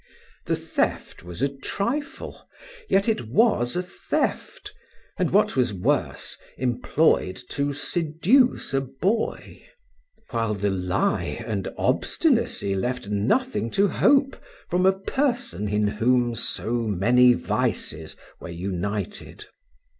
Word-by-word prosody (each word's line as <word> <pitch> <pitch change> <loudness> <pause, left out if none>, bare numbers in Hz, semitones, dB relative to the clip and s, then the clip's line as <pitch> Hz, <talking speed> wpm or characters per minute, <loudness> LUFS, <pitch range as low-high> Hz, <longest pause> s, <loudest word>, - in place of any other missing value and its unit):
The - - +2
theft - - -2
was 90 +7 -6
a - - +4
trifle, 200 - -4 0.4
yet 195 +2 +3
it 220 - 0
was 125 - +2
a 180 - 0
theft, 180 - -3 0.5
and, - - +2
what - - +3
was 125 -6 +1
worse, 90 - -1 0.2
employed 125 - +1
to 140 0 -1
seduce 165 - +1
a 135 - +2
boy; 170 - -2 0.7
while 115 -3 0
the 100 0 0
lie 90 -1 -1
and 100 -4 -3
obstinacy 100 - +1
left 120 +3 -2
nothing 115 - 0
to 200 0 +4
hope 275 +5 +3 0.4
from 180 +2 +3
a 190 - +5
person 240 - -1
in 105 0 +1
whom 120 +3 +2
so 115 +1 -1
many 120 +4 +4
vices 80 -7 -2 0.2
were - - -8
united. 100 - -4
125 Hz, 115 wpm, -24 LUFS, -, 0.7 s, a